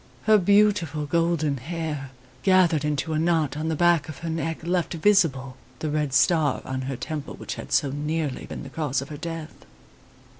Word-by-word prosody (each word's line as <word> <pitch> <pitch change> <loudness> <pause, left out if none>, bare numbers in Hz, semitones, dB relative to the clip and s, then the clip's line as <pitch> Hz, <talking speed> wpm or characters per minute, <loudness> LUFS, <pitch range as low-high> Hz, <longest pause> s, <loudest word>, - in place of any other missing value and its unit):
Her 215 -1 +5
beautiful 195 -6 +3
golden 165 -2 +1
hair, 150 0 -4 0.3
gathered 180 -4 +4
into 150 +1 -1
a 155 - +1
knot 160 -4 +1
on 155 +2 -3
the 160 - 0
back 170 -2 +3
of 150 - -7
her 165 - -2
neck, 160 0 -3
left 175 0 -1
visible 155 -9 +2 0.2
the 155 +3 -3
red 150 -2 0
star 150 0 +3
on 130 0 -3
her 135 - -2
temple 150 +1 -5
which - - -6
had - - -9
so 140 -3 +2
nearly 150 -1 -3
been - - -7
the 140 - -8
cause 140 -2 -2
of 135 - -12
her 150 - -7
death. 165 0 -7
155 Hz, 185 wpm, -25 LUFS, 145-170 Hz, 0.3 s, Her